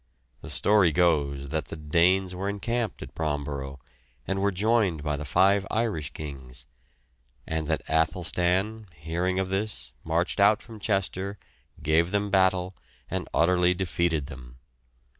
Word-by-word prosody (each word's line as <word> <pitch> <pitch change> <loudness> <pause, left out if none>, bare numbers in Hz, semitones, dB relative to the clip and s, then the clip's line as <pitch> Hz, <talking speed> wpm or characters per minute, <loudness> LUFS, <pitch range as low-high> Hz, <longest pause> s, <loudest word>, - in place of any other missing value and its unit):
The - - -9
story 90 +5 +4
goes 70 -5 +1
that 80 +1 -2
the - - -8
Danes 90 +5 +2
were 95 +2 -3
encamped 115 +1 -2
at - - -11
Bromborough, 70 -3 -3 0.5
and 95 0 -1
were 100 - +3
joined 100 -5 +1
by 75 -1 -1
the 75 +1 -5
five 95 +5 +4
Irish 110 -9 -1
kings; 65 -4 -9 0.8
and 80 -1 -2
that 80 0 -1
Athelstan, 90 +6 +1
hearing 85 +5 -2
of 95 -1 0
this, 95 - -2
marched 85 +5 0
out 100 +1 +5
from 110 -2 -11
Chester, 100 -1 -1 0.5
gave 80 +3 +3
them 100 +1 -1
battle, 95 -1 +3 0.4
and - - -3
utterly 90 +1 +3
defeated 85 -4 0
them. 65 -4 -11
90 Hz, 140 wpm, -27 LUFS, 75-100 Hz, 0.8 s, out